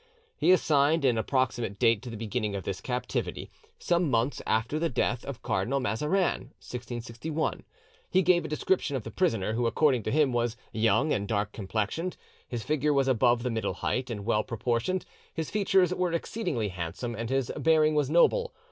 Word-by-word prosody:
He - - +3
assigned 155 -3 +3
an 120 -4 +3
approximate 120 -4 0
date 115 -3 +3
to 125 - -8
the 115 - -6
beginning 110 -1 -2
of 95 - -4
this 95 -1 -4
captivity, 125 +2 -3 0.3
"some 175 -2 +1
months 120 +3 0
after 115 +7 +1
the 165 +1 +1
death 120 -1 0
of 140 -4 -7
Cardinal 140 +3 0
Mazarin" 150 - 0
(1661); 120 +5 -4 0.5
he 190 0 +3
gave 175 0 +4
a - - -4
description 155 -1 0
of 130 - -3
the - - -7
prisoner, 110 - 0
who 120 +1 +1
according 130 0 +3
to 110 - -3
him 145 -3 +3
was 120 -1 0
"young 115 +7 +2
and 100 0 -1
dark 105 -1 -1
complexioned; 110 - -3 0.3
his 120 -3 -4
figure 150 +2 +1
was 135 -1 +2
above 120 -2 +3
the 125 - -1
middle 110 -1 -2
height 125 +1 -2
and 105 -4 -5
well 110 -2 +2
proportioned; 120 - -1 0.3
his 160 -1 -3
features 190 -3 +3
were 180 -1 0
exceedingly 170 - -2
handsome, 90 +7 -4
and 115 +1 -4
his 135 -2 0
bearing 155 -1 +3
was 145 -3 +1
noble. 475 - +3
125 Hz, 180 wpm, -28 LUFS, 115-155 Hz, 0.5 s, gave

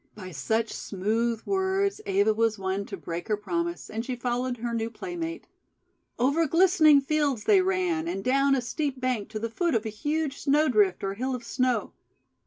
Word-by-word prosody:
By 185 -3 -8
such 220 - -1
smooth 220 +4 -1
words 390 +1 0
Eva 390 - +3
was 225 0 +1
won 190 +1 -2
to - - -6
break 170 +1 -6
her 210 -2 +1
promise, 340 +9 -3
and 225 +1 -4
she 255 +1 -3
followed 245 +1 -2
her 235 +1 -3
new 225 0 -1
playmate. 335 +6 -5 0.7
Over 285 +7 +2
glistening 325 -3 +5
fields 285 -5 0
they 400 -3 +5
ran, 365 -3 0
and 195 -13 -3
down 275 +2 +3
a 260 - 0
steep 270 +2 -3
bank 250 -5 -1
to 220 - -5
the 225 +2 -2
foot 340 +4 0
of 225 0 0
a - - -2
huge 295 +6 -2
Snowdrift 250 - +3
or 195 0 -1
Hill 255 +5 -2
of 245 - -7
Snow. 250 -1 0
255 Hz, 185 wpm, -27 LUFS, 220-325 Hz, 0.7 s, glistening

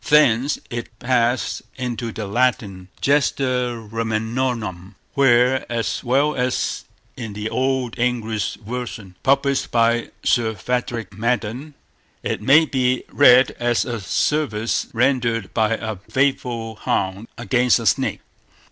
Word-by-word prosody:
Thence 145 -3 +4
it 120 -1 -6
passed 120 0 0
into 120 -2 -4
the 110 0 -5
Latin 100 -4 0
Gesta 130 -4 +1
Romanorum, 110 -4 -2 0.2
where, 130 -1 +4
as 115 -1 -2
well 140 +4 +2
as 125 0 -1 0.3
in 110 -5 -6
the 105 +2 -4
Old 130 -3 -1
English 115 -4 -1
version 115 -4 -6
published 140 0 +2
by 115 0 +2
Sir 110 -2 +2
Frederick 115 -2 -3
Madden, 120 +6 -2 0.5
it - - -2
may 145 +8 +6
be 130 -3 0
read 130 -2 +6
as 120 -1 +1
a 120 -2 -3
service 115 +2 0
rendered 120 -3 0
by 110 -1 +2
a 110 -2 -5
faithful 120 -5 -1
hound 100 +2 -2
against 125 +1 +2
a 115 - -5
snake. 85 - +1
120 Hz, 120 wpm, -21 LUFS, 110-130 Hz, 0.5 s, may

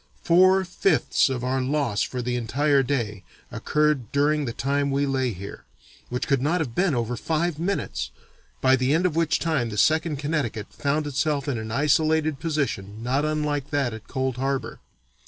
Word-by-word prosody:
Four 185 +2 +5
fifths 175 -7 +2
of 125 -2 -3
our 130 +1 0
loss 130 -6 0
for 125 -1 -2
the 125 0 -1
entire 140 +4 +2
day 115 -7 -2 0.3
occurred 150 -6 0
during 145 +1 +2
the 120 - -2
time 140 +4 0
we 140 +1 +1
lay 130 -2 0
here, 100 0 -8 0.5
which 125 +1 -3
could 135 -3 +2
not 160 +6 +1
have 140 -8 -3
been 180 -2 +1
over 120 0 -1
five 160 +4 -1
minutes, 65 - -2 0.5
by 130 0 +5
the 130 +3 +1
end 175 +3 +1
of 175 -4 +1
which 165 -1 +2
time 150 -8 0
the 105 - -6
Second 160 +3 +2
Connecticut 140 -8 -3
found 150 +2 -1
itself 145 0 -1
in 130 -5 -1
an 110 0 -6
isolated 155 +3 +2
position 115 - -3
not 135 +5 +1
unlike 150 -2 -1
that 140 -5 0
at 110 -1 -10
Cold 130 -2 -2
Harbor. 135 +1 -2
140 Hz, 175 wpm, -25 LUFS, 125-155 Hz, 0.5 s, Four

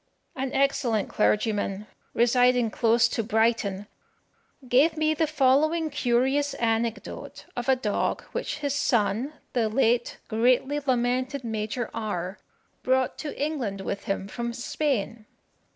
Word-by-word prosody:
An 265 0 -3
excellent 260 -6 +1
clergyman, 210 -2 0 0.3
residing 245 -1 +3
close 230 +1 +3
to 230 - -1
Brighton, 220 -3 +1 0.8
gave 290 +6 +4
me 310 0 +2
the 315 +1 +1
following 310 +3 +2
curious 270 +2 +1
anecdote 230 0 -2
of 245 +2 -3
a 265 - +6
dog 215 -5 -1
which - - -3
his 280 - 0
son, 245 0 +1 0.2
the 230 -4 +1
late 240 +1 +1
greatly 250 +5 +2
lamented 255 0 0
Major 220 +1 -3
R 205 -4 -4 0.4
brought 260 0 +1
to 295 - -6
England 265 -10 -2
with 200 +1 -4
him 195 0 -2
from 235 +2 -4
Spain. 235 -4 -2
240 Hz, 120 wpm, -26 LUFS, 220-270 Hz, 0.8 s, a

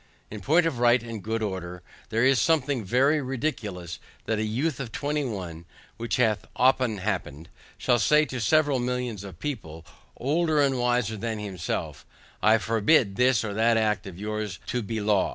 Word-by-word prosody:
In 105 -1 -7
point 165 - +3
of 140 -7 -1
right 120 0 +4
and 115 -3 -6
good 110 +2 -2
order, 90 -3 -5 0.3
there 115 +3 +2
is 135 -1 +4
something 145 -6 +1
very 135 +9 +2
ridiculous, 115 - -4 0.3
that 110 -1 -1
a - - 0
youth 130 +10 -1
of 125 -5 -5
twenty 150 +3 -1
one 90 -9 -5 0.3
(which 115 +1 -2
hath 110 -4 +1
often 125 -3 +3
happened) 90 -6 -4 0.3
shall 120 - +2
say 150 +6 +4
to 130 -4 -5
several 145 0 +3
millions 125 -4 -3
of 95 -4 -10
people, 85 - -6 0.3
older 155 +4 +1
and 135 -3 +2
wiser 120 -3 0
than 115 +1 -3
himself, 95 -6 -4 0.4
I 110 +1 +5
forbid 110 0 +2
this 125 +1 +3
or 105 -2 -3
that 115 +2 +3
act 105 -1 0
of 90 -3 -9
yours 105 -1 -4
to 125 +1 -1
be 110 +1 -3
law. 105 -2 +2
115 Hz, 175 wpm, -26 LUFS, 105-130 Hz, 0.4 s, I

